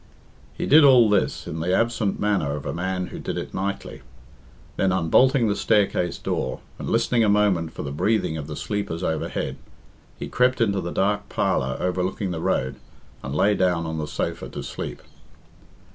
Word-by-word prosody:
He - - -3
did 155 +2 +7
all 125 -6 +7
this 100 - +1
in 80 - -5
the 90 +3 +1
absent 115 -4 0
manner 95 -9 0
of 75 0 -7
a - - -3
man 90 +1 -2
who - - -6
did - - -4
it - - -5
nightly. 100 +1 -4 0.7
Then 95 - +1
unbolting 115 - +3
the 100 - +1
staircase 100 -4 +1
door, - - -3 0.2
and - - -4
listening 115 +1 +2
a 105 - +3
moment 100 -6 +2
for - - -6
the 70 - -4
breathing 90 +2 0
of 75 -2 -5
the 75 - -6
sleepers 100 -4 -3
overhead, 80 -3 -2 0.6
he - - -5
crept 125 0 +2
into 100 -4 +1
the 85 - -4
dark 100 +3 0
parlour 65 0 0
overlooking 90 +1 -1
the 80 -2 -4
road, 65 -4 -1 0.4
and 70 +2 -5
lay 100 +7 +3
down 90 -4 +1
on 80 0 -3
the 75 - -3
sofa - - -3
to - - -6
sleep. - - -6
95 Hz, 180 wpm, -24 LUFS, 80-105 Hz, 0.7 s, did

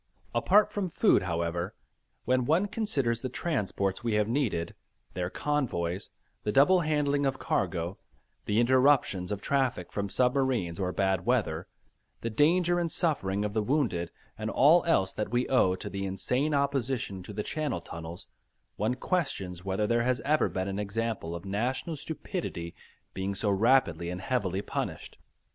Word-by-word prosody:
Apart 195 - +4
from 195 -3 -2
food 180 - +4
however, 85 +1 -2 0.5
when 125 0 +2
one 165 +8 +3
considers 140 - -1
the 130 - -3
transports 105 - -1
we 115 -2 0
have 105 0 +2
needed, 115 - -1 0.4
their 90 0 -2
convoys, 100 -11 -1 0.3
the 105 - -1
double 145 - +5
handling 150 -3 +1
of 135 -1 0
cargo, 90 -1 -1 0.5
the 105 +2 +1
interruptions 125 -7 +3
of 100 -1 -3
traffic 130 -10 0
from 100 -1 -2
submarines 125 -8 +1
or 90 -1 0
bad 95 -1 +1
weather, 95 -9 +1 0.5
the 115 - -3
danger 175 +8 +3
and 170 -2 -1
suffering 105 - 0
of 105 - -3
the 110 - +1
wounded, 105 - 0 0.3
and 110 0 -2
all 155 +8 +5
else 95 - +2
that 105 - -3
we 120 +2 0
owe 95 -8 +4
to - - -7
the 100 0 -4
insane 125 +10 0
opposition 135 -8 -1
to 90 - -9
the 105 +1 -3
Channel 150 - -2
tunnels, 85 0 -8 0.5
one 110 +5 0
questions 100 - -2
whether 95 +2 0
there 115 +2 +2
has 125 +1 +1
ever 150 +2 +2
been 95 -1 -2
an 100 +1 -3
example 105 -4 -2
of 85 +2 -7
national 125 - -2
stupidity 150 - -5 0.4
being 95 +1 -3
so 100 +1 +1
rapidly 100 -6 +3
and 90 +1 -5
heavily 100 -5 -1
punished. - - -5
115 Hz, 155 wpm, -29 LUFS, 95-140 Hz, 0.5 s, double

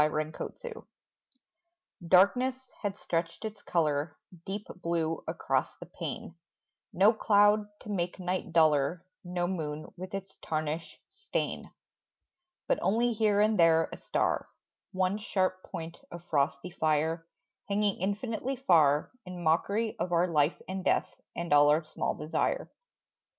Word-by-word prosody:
WAKING 155 - -3 1.2
Darkness 250 +8 +3
had 205 -1 -2
stretched 165 +4 -2
its 215 -1 -6
colour, 150 -4 0 0.3
Deep 200 +1 -4
blue 165 -2 -1
across - - -1
the - - -8
pane: - - -6 0.6
No 200 +5 +5
cloud 205 -1 +4
to - - -10
make 180 -3 -2
night 185 -1 -3
duller, 155 +1 +3 0.2
No 175 -1 -2
moon 155 -4 -4
with 185 +2 -6
its 195 0 -7
tarnish 155 +1 -3
stain; 415 +3 -3 1.0
But - - +2
only 230 +6 +2
here 210 -2 +3
and 215 -1 +3
there 165 -1 +5
a - - -7
star, - - 0 0.4
One 190 +1 0
sharp 185 -3 0
point 165 -1 -7
of 170 0 -9
frosty 145 +3 0
fire, 160 +1 0 0.4
Hanging 205 0 +1
infinitely 220 +6 -2
far 155 - +4 0.2
In 180 -1 -6
mockery 200 +8 +1
of 180 - -2
our 175 +1 +3
life 150 -1 +2
and 190 0 -4
death - - 0
And 170 -3 -1
all 145 0 +7
our 155 +2 +3
small 155 - -2
desire. 160 - -1
180 Hz, 130 wpm, -30 LUFS, 160-205 Hz, 1.2 s, all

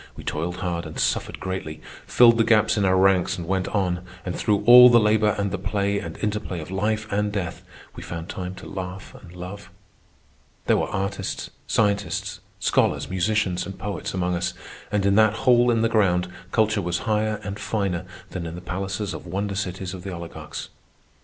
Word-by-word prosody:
We - - -10
toiled 85 +3 -3
hard 85 -3 -3
and 80 - -9
suffered - - -1
greatly, 95 -5 -5 0.3
filled 115 -1 +6
the - - +6
gaps 110 -1 +4
in 105 -2 +1
our 95 0 +3
ranks 95 -1 +3
and 85 -2 -6
went 95 0 0
on, 90 -3 -1 0.2
and 90 - -3
through 105 -2 +1
all 125 +1 +10
the 120 -1 +6
labour 105 -1 +3
and 100 -1 -1
the 100 - -3
play 100 0 0
and 85 -3 -7
interplay 105 -4 -2
of 80 +3 -8
life 105 +3 0
and 105 +1 0
death 95 -5 -4 0.3
we - - -8
found 85 -1 -6
time 95 -1 -5
to - - -11
laugh 95 0 -7
and 90 -2 -14
love. 90 +2 -8 1.0
There - - +3
were - - 0
artists, 95 0 -3 0.2
scientists, 100 -2 0 0.2
scholars, - - +1
musicians, 95 -1 0
and 95 - -8
poets 100 -1 -4
among 90 -1 -1
us; 90 +1 -2 0.4
and 105 -2 +1
in 100 - +4
that 110 -1 +5
hole 125 -1 +5
in 115 -1 +2
the - - +4
ground 95 -6 +2 0.2
culture 110 -2 +2
was 90 -1 -2
higher 110 -1 0
and 100 0 -5
finer 95 -5 -2 0.3
than 85 -3 -4
in 80 - -6
the 90 - -8
palaces 95 +2 -3
of 80 - -8
wonder 100 +3 -2
cities 95 -1 -4
of 95 - -7
the 95 +1 -6
oligarchs. 85 -1 -7
95 Hz, 190 wpm, -24 LUFS, 90-105 Hz, 1.0 s, all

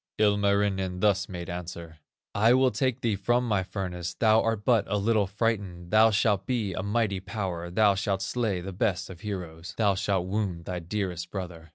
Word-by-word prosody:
"Ilmarinen 100 -3 +2
thus 95 -2 +2
made 90 -2 -6
answer: 85 -3 -7 0.3
'I 115 +4 +5
will 130 0 +4
take 130 +3 -1
thee 115 -3 +1
from 120 +5 +1
my 105 -4 +2
furnace, 90 -3 -4
Thou 110 0 +4
art 115 -2 -1
but 115 -5 +4
a 105 - 0
little 105 -1 +2
frightened, 100 -4 -2
Thou 110 +1 +6
shalt 105 -2 +1
be 115 -7 -1
a 95 - -3
mighty 100 -1 0
power, 95 -4 -4
Thou 100 +3 +4
shalt 95 0 -1
slay 110 -7 -1
the 95 +2 -6
best 95 -2 -1
of 85 -1 -12
heroes, 90 -5 -6
Thou 105 -3 +3
shalt 95 -1 0
wound 95 -4 -2
thy 90 -1 -3
dearest 90 -1 -3
brother. 85 -4 -7
100 Hz, 185 wpm, -27 LUFS, 90-110 Hz, 0.3 s, Thou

